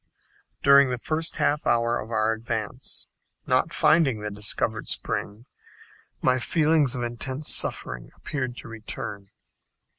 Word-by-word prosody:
During 140 Hz, -1 st, +7 dB
the 125 Hz, -, -1 dB
first 155 Hz, +6 st, -1 dB
half 145 Hz, -1 st, +1 dB
hour 120 Hz, 0 st, +2 dB
of 110 Hz, -, -7 dB
our 110 Hz, -1 st, +1 dB
advance, 115 Hz, +2 st, -4 dB, 0.4 s
not -, -, +2 dB
finding 155 Hz, -8 st, +3 dB
the 105 Hz, 0 st, -4 dB
discovered 105 Hz, +2 st, -1 dB
spring, 105 Hz, +4 st, -3 dB, 0.8 s
my 130 Hz, 0 st, +3 dB
feelings 150 Hz, -1 st, +2 dB
of 120 Hz, -, -2 dB
intense 130 Hz, +5 st, -1 dB
suffering -, -, 0 dB
appeared 130 Hz, -4 st, -4 dB
to -, -, -9 dB
return. 105 Hz, -3 st, -6 dB
120 Hz, 125 wpm, -25 LUFS, 110-140 Hz, 0.8 s, During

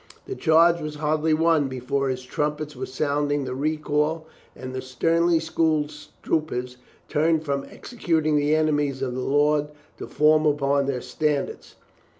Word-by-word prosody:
The 395 Hz, -, -5 dB
charge 170 Hz, -, +4 dB
was 150 Hz, 0 st, -5 dB
hardly 155 Hz, +1 st, +1 dB
won 160 Hz, -2 st, +2 dB
before 135 Hz, +1 st, -2 dB
his 130 Hz, -1 st, -3 dB
trumpets 150 Hz, +3 st, -3 dB
were 125 Hz, -, -5 dB
sounding 145 Hz, +1 st, -1 dB
the 130 Hz, -, -4 dB
recall 150 Hz, +2 st, -1 dB, 0.3 s
and 130 Hz, 0 st, -8 dB
the 130 Hz, -, -4 dB
sternly 165 Hz, +6 st, +1 dB
schooled 160 Hz, -2 st, 0 dB, 0.3 s
troopers 125 Hz, -6 st, -2 dB, 0.3 s
turned 160 Hz, +1 st, +1 dB
from 140 Hz, -1 st, -2 dB
executing 160 Hz, -10 st, -1 dB
the 150 Hz, +1 st, +2 dB
enemies 145 Hz, -3 st, 0 dB
of 125 Hz, -2 st, -2 dB
the 130 Hz, -, -4 dB
Lord 145 Hz, +2 st, +2 dB, 0.3 s
to -, -, -6 dB
form 155 Hz, +1 st, +3 dB
upon 140 Hz, -1 st, +1 dB
their 130 Hz, -3 st, -2 dB
standards. 150 Hz, -2 st, -3 dB
150 Hz, 150 wpm, -24 LUFS, 140-155 Hz, 0.3 s, charge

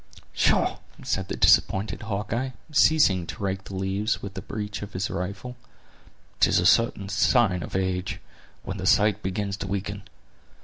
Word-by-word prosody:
"Pshaw!" -, -, +2 dB, 0.2 s
said -, -, -2 dB
the -, -, -4 dB
disappointed 100 Hz, +2 st, +3 dB
Hawkeye, 110 Hz, +5 st, -3 dB, 0.2 s
ceasing 145 Hz, -, +4 dB
to -, -, -7 dB
rake 95 Hz, 0 st, -2 dB
the 95 Hz, -, -8 dB
leaves 95 Hz, +3 st, -1 dB
with 100 Hz, -1 st, -7 dB
the 95 Hz, -, -6 dB
breech 105 Hz, -1 st, -5 dB
of 100 Hz, 0 st, -8 dB
his 95 Hz, +2 st, -2 dB
rifle; 100 Hz, +7 st, -5 dB, 0.8 s
"'tis -, -, +4 dB
a 90 Hz, -, +2 dB
certain 100 Hz, 0 st, +3 dB
sign 95 Hz, 0 st, +2 dB
of 75 Hz, -, -7 dB
age, 95 Hz, -1 st, -2 dB, 0.4 s
when 100 Hz, +1 st, -5 dB
the 95 Hz, 0 st, -3 dB
sight 105 Hz, 0 st, +3 dB
begins 100 Hz, +1 st, -3 dB
to 100 Hz, -, -5 dB
weaken. 100 Hz, +1 st, -3 dB
100 Hz, 160 wpm, -25 LUFS, 95-105 Hz, 0.8 s, ceasing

